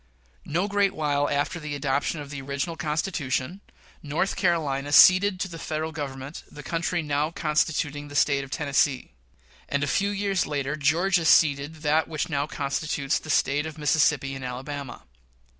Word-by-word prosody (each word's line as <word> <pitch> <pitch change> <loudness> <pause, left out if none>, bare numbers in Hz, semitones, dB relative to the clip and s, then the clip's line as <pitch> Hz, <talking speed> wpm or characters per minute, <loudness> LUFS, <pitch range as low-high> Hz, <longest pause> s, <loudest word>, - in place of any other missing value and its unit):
No 175 +6 0
great 200 -1 +1
while 145 -2 0
after 145 +5 -1
the 150 -2 -5
adoption 145 +2 -1
of 145 -1 -8
the 140 -2 -6
original 140 +5 -3
Constitution, 155 0 -2 0.4
North 155 +6 -1
Carolina 145 -6 0
ceded 185 +2 +7
to 195 - -1
the 165 -2 -9
Federal 155 +1 -3
Government 140 -1 -6
the 145 - -10
country 170 0 -1
now 150 +1 0
constituting 150 -2 -1
the 145 - -10
State 140 -1 +2
of 135 - -10
Tennessee; 135 - 0 0.6
and, 140 0 0
a 145 - 0
few 200 +1 +1
years 200 -3 0
later, 145 -1 -2
Georgia 170 +4 +2
ceded 150 0 +3
that 155 +1 +2
which 160 +2 -3
now 145 -1 -1
constitutes 140 0 -2
the 155 - -12
States 145 +1 +1
of 160 0 -9
Mississippi 150 -2 +2
and 135 -1 -7
Alabama. 135 +2 -6
150 Hz, 160 wpm, -25 LUFS, 140-165 Hz, 0.6 s, ceded